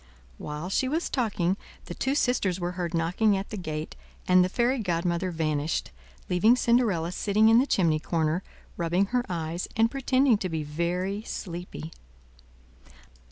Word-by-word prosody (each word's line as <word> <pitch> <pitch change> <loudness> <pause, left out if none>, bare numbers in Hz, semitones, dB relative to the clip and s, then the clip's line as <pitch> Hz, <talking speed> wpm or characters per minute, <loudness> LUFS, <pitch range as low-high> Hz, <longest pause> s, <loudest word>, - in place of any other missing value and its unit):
While 150 +4 -5
she 260 - +1
was 320 +6 -1
talking, 200 -7 0 0.3
the - - -6
two 270 +1 -1
sisters 205 -10 +1
were 175 0 -2
heard 175 -1 -3
knocking 180 +5 +2
at 195 - -6
the - - -3
gate, 155 -5 -5 0.3
and 185 0 +6
the 180 - 0
fairy 245 +5 +1
godmother 175 -2 -1
vanished, 155 -2 -1 0.4
leaving 210 +7 +4
Cinderella 225 -10 +2
sitting 210 +4 +3
in 225 +1 +7
the 265 - +2
chimney 165 - +2
corner, 160 +1 0 0.4
rubbing 175 +3 +1
her 250 -1 +2
eves 170 0 -3
and 225 +1 +3
pretending 265 -3 +2
to 185 - -2
be 160 -2 -2
very 175 +6 -2
sleepy. 175 -5 -7
180 Hz, 155 wpm, -27 LUFS, 165-220 Hz, 0.4 s, in